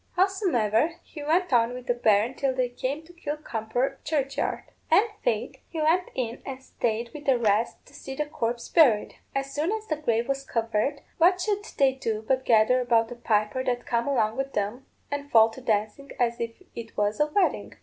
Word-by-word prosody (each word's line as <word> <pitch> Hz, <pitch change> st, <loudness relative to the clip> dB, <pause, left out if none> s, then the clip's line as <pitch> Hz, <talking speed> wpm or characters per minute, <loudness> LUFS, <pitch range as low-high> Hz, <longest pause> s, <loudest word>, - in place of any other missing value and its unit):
Howsomever, 335 Hz, -, +2 dB
he 300 Hz, -, -10 dB
went 325 Hz, +2 st, +1 dB
on 235 Hz, 0 st, +3 dB
with 250 Hz, 0 st, -8 dB
the 245 Hz, -, +2 dB
berrin 225 Hz, 0 st, +3 dB
till 265 Hz, 0 st, -1 dB
they 255 Hz, -1 st, +1 dB
came 265 Hz, +5 st, -3 dB
to 345 Hz, +2 st, -16 dB
Kilcrumper 270 Hz, -5 st, -3 dB
churchyard; 280 Hz, -3 st, -1 dB, 0.3 s
and, 430 Hz, -, +5 dB, 0.2 s
faith, -, -, -1 dB
he 325 Hz, -, -5 dB
went 330 Hz, +4 st, +2 dB
in 235 Hz, -2 st, -3 dB
and 265 Hz, -1 st, -6 dB
stayed 235 Hz, -2 st, -2 dB
with 295 Hz, -1 st, -9 dB
the 265 Hz, -3 st, +4 dB
rest, 220 Hz, 0 st, +1 dB
to -, -, -19 dB
see 270 Hz, -, -8 dB
the 300 Hz, -, -1 dB
corpse 235 Hz, -5 st, -3 dB
buried. 255 Hz, -11 st, +4 dB, 0.2 s
As 275 Hz, 0 st, -2 dB
soon 310 Hz, +6 st, 0 dB
as 435 Hz, 0 st, -3 dB
the 310 Hz, -7 st, -2 dB
grave 235 Hz, -5 st, 0 dB
was 275 Hz, 0 st, -1 dB
covered, 230 Hz, +4 st, -1 dB, 0.2 s
what 360 Hz, +3 st, +5 dB
should 410 Hz, +2 st, -1 dB
they 270 Hz, -1 st, +4 dB
do 225 Hz, -5 st, -3 dB
but 260 Hz, -1 st, +1 dB
gather 230 Hz, +3 st, +4 dB
about 230 Hz, -1 st, +2 dB
a -, -, -5 dB
piper 215 Hz, +1 st, 0 dB
that 245 Hz, -1 st, -1 dB
come 235 Hz, +1 st, 0 dB
along 225 Hz, -5 st, +1 dB
with 270 Hz, -2 st, -3 dB
'em, 210 Hz, +6 st, -2 dB, 0.2 s
and 285 Hz, 0 st, -4 dB
fall 225 Hz, -2 st, +6 dB
to 260 Hz, -, -11 dB
dancing 220 Hz, +4 st, -1 dB
as 235 Hz, -1 st, +1 dB
if 230 Hz, +9 st, -5 dB
it 230 Hz, -1 st, -9 dB
was 210 Hz, 0 st, 0 dB
a 300 Hz, -, +4 dB
wedding. 365 Hz, +5 st, 0 dB
255 Hz, 200 wpm, -26 LUFS, 230-295 Hz, 0.3 s, fall